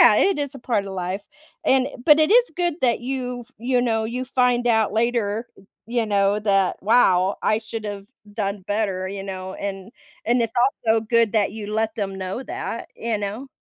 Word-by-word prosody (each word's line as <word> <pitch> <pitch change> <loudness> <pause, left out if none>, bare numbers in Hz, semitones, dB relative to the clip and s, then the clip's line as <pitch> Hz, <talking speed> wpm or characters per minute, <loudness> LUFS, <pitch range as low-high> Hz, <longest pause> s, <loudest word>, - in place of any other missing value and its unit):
Yeah, - - +8
it 390 -5 +3
is 285 -2 -3
a - - -8
part 225 -5 -1
of 195 - -6
life, 185 +2 -3 0.4
and 265 0 +3 0.2
but 300 0 +8
it 310 - +3
is 485 +1 +5
good 350 -3 0
that 240 -3 +2
you've 250 -1 -4
you 245 +2 +1
know, 225 -2 +1
you 245 +3 -3
find 250 -1 +2
out 220 -3 +3
later, 225 -1 0 0.4
you 235 0 0
know, 200 0 +2
that, 195 -3 +2
"Wow, 195 -3 +4
I 215 - +3
should've 215 -3 -6 0.3
done 200 -2 -2
better," 200 -3 -1
you 195 0 -5
know, 190 -1 -6
and 195 0 -5 0.4
and 240 +1 +3
it's 230 -1 -2 0.4
also 220 0 +4
good 230 0 +2
that 210 -3 +2
you 210 -1 -6
let 220 0 0
them 200 -3 -3
know 190 +7 -4
that, 235 - -5
you 230 -1 -1
know? 210 +6 -4
220 Hz, 190 wpm, -23 LUFS, 200-245 Hz, 0.4 s, Yeah